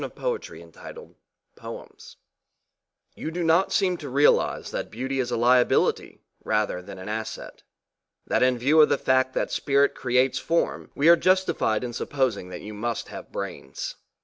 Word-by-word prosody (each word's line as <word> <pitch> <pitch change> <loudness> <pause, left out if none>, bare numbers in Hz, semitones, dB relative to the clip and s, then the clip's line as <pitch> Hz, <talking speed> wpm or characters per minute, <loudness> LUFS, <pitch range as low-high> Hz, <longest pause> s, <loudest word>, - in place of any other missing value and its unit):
ROSES 485 -2 -5 1.0
ONLY - - -8 1.2
You - - -5
do 175 +2 -3
not 165 +3 +3
seem 185 -3 +1
to 145 -4 -8
realise 140 +3 +2
that - - -4
beauty 130 +4 -3
is 125 -2 -1
a 125 - -1
liability 125 +1 +2 0.2
rather 105 -4 0
than 95 +2 -10
an 95 - -9
asset 110 +1 -6 0.6
that - - 0
in 125 0 +3
view 145 +6 +4
of 150 - +5
the - - +2
fact 130 0 +1
that - - -1
spirit 140 0 +2
creates 125 +1 +1
form 170 +1 -1
we 145 - +2
are 170 - +9
justified 185 - +1
in 120 -1 -4
supposing 125 -7 -1
that 90 - -8
you 105 +1 -8
musl: 115 +2 -4
have - - -9
brains. 65 - -6
130 Hz, 155 wpm, -25 LUFS, 115-155 Hz, 1.2 s, are